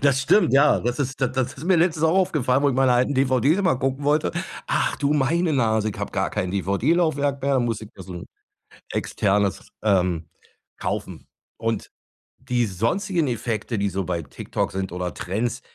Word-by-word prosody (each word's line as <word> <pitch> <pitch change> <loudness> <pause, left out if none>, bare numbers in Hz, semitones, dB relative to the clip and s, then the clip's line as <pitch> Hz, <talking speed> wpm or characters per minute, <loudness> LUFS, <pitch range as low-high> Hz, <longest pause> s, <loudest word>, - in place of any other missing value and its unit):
Das 140 -1 +3
stimmt, 145 - +4
ja. 145 +2 +5
Das 120 +3 -2
ist 135 -1 -3
das 130 -1 +1
das 130 -2 -1
ist 140 - -9
mir 185 +1 +4
letztens 165 -2 +2
auch 160 - +3
aufgefallen, 145 -8 +2
wo 145 - +4
ich 130 - 0
meine 130 -1 +4
alten 125 +3 +2
DVDs 135 - +3
einmal 185 -10 +2
gucken 135 +1 -2
wollte. 150 +1 +2 0.3
Ach, - - 0
du, 145 0 +1
meine 160 +4 +1
Nase, 110 -4 +1
ich - - -9
habe - - -3
gar - - 0
kein 90 - -2
DVD 100 - +1
Laufwerk 145 -5 0
mehr. 140 -1 +2
Muss 115 -3 -1
ich 110 - -9
da 95 - -10
so 90 +1 -9
'n 85 - -7 0.7
Externes, 100 -1 0 0.2
ähm, 90 -6 +1 0.5
kaufen. - - -4 0.3
Und 115 -2 -3 0.5
die 120 -1 0
sonstigen 160 - 0
Effekte, 115 -1 -2
die 100 - +1
so 95 +1 -2
bei 85 -1 -2
TikTok - - -3
sind 95 -2 -3
oder 90 -1 -3
Trends, 115 +7 -3
125 Hz, 190 wpm, -23 LUFS, 105-145 Hz, 0.7 s, ja